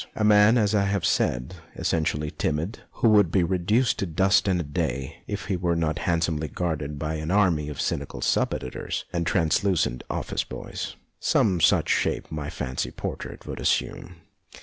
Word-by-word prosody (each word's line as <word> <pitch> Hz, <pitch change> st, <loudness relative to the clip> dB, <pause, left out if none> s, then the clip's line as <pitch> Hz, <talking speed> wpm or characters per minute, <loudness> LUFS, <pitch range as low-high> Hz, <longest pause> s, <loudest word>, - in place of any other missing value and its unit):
A 110 Hz, -, -1 dB
man, 105 Hz, +2 st, +6 dB
as 105 Hz, -2 st, +2 dB
I 100 Hz, -2 st, +3 dB
have 100 Hz, -2 st, 0 dB
siaid, 60 Hz, +4 st, +1 dB, 0.2 s
essentially 75 Hz, -2 st, -1 dB
timid, 80 Hz, +8 st, -2 dB
who 115 Hz, -, +3 dB
would 105 Hz, -5 st, +5 dB
be 95 Hz, -2 st, +3 dB
reduced 95 Hz, +8 st, +1 dB
to 100 Hz, -, -1 dB
dust 95 Hz, +5 st, +3 dB
in 95 Hz, -2 st, +2 dB
a -, -, -1 dB
day 70 Hz, -3 st, -3 dB
if -, -, -4 dB
he 100 Hz, -, -1 dB
were 85 Hz, -1 st, 0 dB
not 80 Hz, -2 st, 0 dB
handsomely 80 Hz, -2 st, 0 dB
guarded 75 Hz, -4 st, -3 dB
by 75 Hz, +2 st, -3 dB
an 80 Hz, +1 st, -4 dB
army 90 Hz, -7 st, +2 dB
of 75 Hz, -, -7 dB
cynical -, -, -2 dB
sub -, -, +1 dB
editors 65 Hz, -, -5 dB
and 85 Hz, -1 st, -1 dB
truculent 85 Hz, -6 st, +1 dB
office -, -, -2 dB
boys. -, -, -6 dB, 0.2 s
Some 95 Hz, -5 st, +2 dB
such -, -, +4 dB
shape -, -, 0 dB
my 75 Hz, -2 st, -4 dB
fancy 65 Hz, 0 st, -3 dB
portrait -, -, -6 dB
would -, -, -6 dB
assume. 90 Hz, -, -1 dB
85 Hz, 170 wpm, -25 LUFS, 75-100 Hz, 0.2 s, man